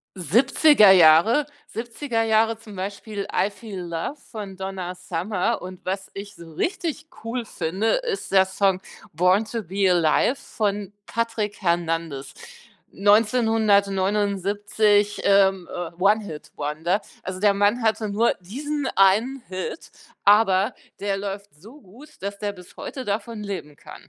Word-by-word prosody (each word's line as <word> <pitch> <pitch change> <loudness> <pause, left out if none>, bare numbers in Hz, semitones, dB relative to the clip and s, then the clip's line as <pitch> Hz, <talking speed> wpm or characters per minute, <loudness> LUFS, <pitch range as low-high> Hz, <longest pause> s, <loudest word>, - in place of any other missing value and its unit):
70er 220 - +5
Jahre 185 - +6 0.2
70er 235 +1 -3
Jahre, 225 0 +2
zum 215 -2 -12
Beispiel 200 +2 -5
„I 200 - +1
Feel 200 -2 -8
Love“ 170 - -4
von 205 -4 -7
Donna 190 -1 -5
Summer, 185 +5 -2
und 185 +1 -10
was 190 +1 -4
ich 200 +1 -8
so 165 -3 -13
richtig 315 - -3 0.2
cool 235 +1 -3
finde, 190 +2 -2
ist 475 - -4
der 190 -1 +5
Song 190 -1 +1 0.3
„Born 180 +6 +3
to 225 0 -4
Be 195 +2 -1
Alive“ 170 - +3
von 205 -6 -3
Patrick 225 -3 -2
Hernandez, 165 -6 -1 0.6
1979, 205 -1 +2
ähm, 195 -2 +3
äh, 175 -2 -4
One-Hit-Wonder. 175 -3 0 0.2
Also 185 0 -5
der 205 +1 +4
Mann 205 +4 +2
hatte 220 -1 +1
nur 215 +4 +2
diesen 285 +9 -4
einen 215 +8 +3
Hit, 185 - -6 0.3
aber 205 -1 +4 0.3
der 200 -1 -1
läuft 200 -2 -6
so 220 - -15
gut, 240 +11 -15
dass 200 +1 -4
der 205 0 -3
bis 180 -2 -15
heute 260 - -6
davon 215 +1 -3
leben 190 -8 -6
kann. - - -13
200 Hz, 130 wpm, -23 LUFS, 185-225 Hz, 0.6 s, Jahre